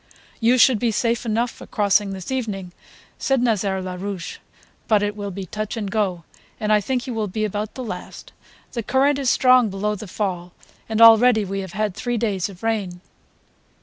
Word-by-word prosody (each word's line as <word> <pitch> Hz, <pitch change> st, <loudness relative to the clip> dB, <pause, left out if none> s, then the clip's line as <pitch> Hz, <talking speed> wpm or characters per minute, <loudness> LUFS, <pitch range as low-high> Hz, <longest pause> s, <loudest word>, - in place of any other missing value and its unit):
"You 240 Hz, +2 st, +4 dB
should 250 Hz, -2 st, +5 dB
be 235 Hz, -, +1 dB
safe 230 Hz, +2 st, 0 dB
enough 230 Hz, +2 st, 0 dB
for -, -, -13 dB
crossing 205 Hz, -1 st, +2 dB
this 190 Hz, +3 st, -6 dB
evening," 205 Hz, -8 st, -3 dB, 0.5 s
said 270 Hz, -1 st, +1 dB
Nazaire 200 Hz, -5 st, 0 dB
Larouche, 185 Hz, 0 st, -5 dB, 0.5 s
"but 210 Hz, -2 st, +3 dB
it 205 Hz, 0 st, -1 dB
will 205 Hz, -1 st, -5 dB
be 195 Hz, 0 st, -6 dB
touch 215 Hz, +5 st, -5 dB
and 205 Hz, -3 st, -3 dB
go, 190 Hz, -6 st, -1 dB, 0.4 s
and 215 Hz, 0 st, +1 dB
I 210 Hz, -, +4 dB
think 250 Hz, +3 st, -2 dB
you 255 Hz, -, -4 dB
will 220 Hz, -2 st, -1 dB
be 215 Hz, +3 st, -2 dB
about 210 Hz, +1 st, -4 dB
the 255 Hz, -, -5 dB
last. 180 Hz, -6 st, -8 dB, 0.4 s
The 235 Hz, -, -3 dB
current 275 Hz, +5 st, +2 dB
is 270 Hz, -3 st, +1 dB
strong 255 Hz, -3 st, +5 dB
below 200 Hz, +2 st, -2 dB
the 210 Hz, 0 st, -7 dB
fall 180 Hz, -3 st, -3 dB, 0.4 s
and 220 Hz, 0 st, 0 dB
already 225 Hz, -1 st, +7 dB
we 195 Hz, +1 st, -3 dB
have 190 Hz, -3 st, -6 dB
had 210 Hz, -1 st, -1 dB
three 240 Hz, +5 st, -2 dB
days 205 Hz, -5 st, -1 dB
of 185 Hz, 0 st, -13 dB
rain.'" 205 Hz, -6 st, -2 dB
210 Hz, 190 wpm, -22 LUFS, 195-230 Hz, 0.5 s, already